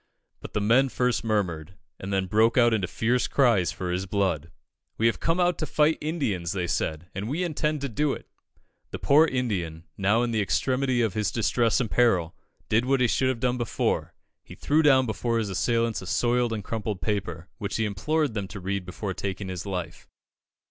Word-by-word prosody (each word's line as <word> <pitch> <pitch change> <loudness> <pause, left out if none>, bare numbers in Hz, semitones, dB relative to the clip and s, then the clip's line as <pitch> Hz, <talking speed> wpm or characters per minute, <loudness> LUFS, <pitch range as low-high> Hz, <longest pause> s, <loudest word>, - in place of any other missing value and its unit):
But - - -10
the 105 - 0
men 120 +6 +4
first 125 -6 0
murmured, 95 -6 -2 0.2
and 95 - -6
then 95 -1 +1
broke 110 +5 +3
out 120 -2 +5
into 100 -5 0
fierce 115 +6 0
cries 115 -10 +3
for 90 -1 -4
his 90 +2 -2
blood. 90 -5 -1 0.5
"We 115 - +1
have 115 - +2
come 165 +2 0
out 175 -1 +2
to 155 - -2
fight 155 +1 +2
Indians," 115 - -2
they 90 -3 -1
said, 80 -1 -2
"and 100 +4 -4
we 160 +7 -1
intend 155 -3 -1
to 140 - -1
do 140 +5 0
it." - - -9 0.6
The - - -5
poor 155 +3 +5
Indian, 95 - -2 0.2
now 105 +5 +3
in 120 - -1
the 110 -2 +1
extremity 130 +4 +1
of 110 -4 0
his 105 -2 0
distress 115 -2 +1
and 115 - -2
peril, 95 -9 +2 0.3
did 115 +3 +2
what 135 +1 +2
he 125 - +4
should 130 +5 +1
have 130 -3 -2
done 125 +1 0
before 120 - -1 0.3
he - - -12
threw 150 +2 +2
down 135 -4 +5
before 115 +1 -1
his 110 -3 -1
assailants 115 +3 0
a 95 - -9
soiled 120 +3 +1
and 110 -2 -3
crumpled 105 -2 -3
paper, 95 -5 -3
which 100 -2 -3
he 110 - +1
implored 140 - 0
them 100 -3 -3
to 100 - -8
read 95 0 -3
before 95 +2 -4
taking 95 0 -4
his 90 +1 -5
life. 90 -3 -5
110 Hz, 205 wpm, -26 LUFS, 95-125 Hz, 0.6 s, out